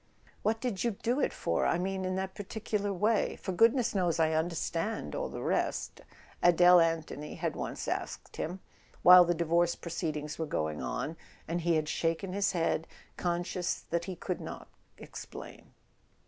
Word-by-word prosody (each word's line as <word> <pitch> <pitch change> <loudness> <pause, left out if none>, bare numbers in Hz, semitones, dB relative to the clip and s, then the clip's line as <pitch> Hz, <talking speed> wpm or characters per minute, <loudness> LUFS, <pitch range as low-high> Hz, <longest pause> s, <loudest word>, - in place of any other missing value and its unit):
"What 220 +2 +1
did 235 -6 -2
you 235 -4 -1
do 245 +4 +1
it - - +1
for—I - - 0
mean 190 +1 -2
in 185 0 -1
that 190 0 -3
particular 205 0 -3
way? 210 +4 +1
For 190 - -5
goodness 230 +5 +4
knows 175 -5 +1
I 160 -1 +3
understand 165 +5 -1
all - - -2
the - - -6
rest," - - -1 0.4
Adele 175 +1 +7
Anthony 165 -2 -1
had - - -2
once - - -4
asked - - -4
him, 180 +4 -4 0.4
while 180 0 +10
the 175 0 +1
divorce 170 +1 +2
proceedings 155 -3 -4
were 160 - -1
going 80 - -2
on; 105 - -3 0.3
and 170 +1 -1
he 170 0 +2
had 155 -1 0
shaken 165 +4 -1
his 200 0 +1
head, 165 -2 0 0.3
conscious 175 0 -1
that 170 0 0
he 190 - -5
could - - -4
not - - -7 0.3
explain. - - -10
175 Hz, 160 wpm, -31 LUFS, 165-195 Hz, 0.4 s, while